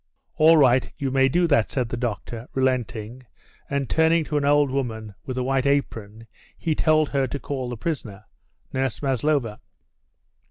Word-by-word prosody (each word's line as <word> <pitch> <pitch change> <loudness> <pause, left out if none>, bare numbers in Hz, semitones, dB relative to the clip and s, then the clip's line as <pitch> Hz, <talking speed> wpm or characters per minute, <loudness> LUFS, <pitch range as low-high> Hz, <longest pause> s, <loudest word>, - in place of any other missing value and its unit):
"All 160 +1 +6
right, 130 -3 +4
you 135 -2 -2
may 135 0 +3
do 175 +6 +2
that," 145 -9 +2
said 125 -4 -1
the 120 - -3
doctor, 120 0 -4
relenting, 125 -3 -1 0.5
and 140 -2 -1
turning 160 +3 +3
to 150 0 -2
an 145 - 0
old 145 -1 +3
woman 110 -6 -3
with 130 -1 -4
a 130 - 0
white 135 +1 0
apron, 115 -6 -2 0.3
he 165 - -1
told 155 -1 +2
her 135 -2 0
to 140 - -4
call 130 -3 -4
the 120 - -5
prisoner 110 -9 -5 0.5
Nurse 130 0 -2
Maslova. 135 -4 0
130 Hz, 165 wpm, -24 LUFS, 120-145 Hz, 0.5 s, All